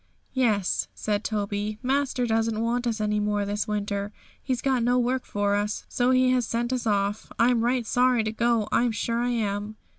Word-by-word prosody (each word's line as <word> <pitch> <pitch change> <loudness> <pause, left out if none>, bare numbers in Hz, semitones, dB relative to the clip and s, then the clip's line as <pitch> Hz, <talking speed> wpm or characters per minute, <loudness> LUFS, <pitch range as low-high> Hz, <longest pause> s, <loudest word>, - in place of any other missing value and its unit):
'Yes,' 215 -8 +1
said 210 0 -1
Toby; 210 0 -2
'master 265 -1 0
doesn't 225 -1 0
want 240 +2 0
us 225 -1 -1
any 210 0 0
more 205 -1 0
this 205 +2 -2
winter; 205 -1 -2 0.3
he's 255 -3 -2
got 260 -2 +1
no 245 +2 +2
work 250 +1 0
for 205 0 0
us, 205 +1 -1
so 245 0 +1
he 255 0 +4
has 255 -1 +2
sent 235 +2 -1
us 250 -3 -2
off. 205 0 0
I'm 235 0 +3
right 245 0 +1
sorry 245 0 +3
to 215 - -2
go, 230 -1 +1
I'm 240 0 +2
sure 230 +1 -1
I 245 - 0
am.' 210 -2 -2
225 Hz, 190 wpm, -26 LUFS, 210-245 Hz, 0.3 s, he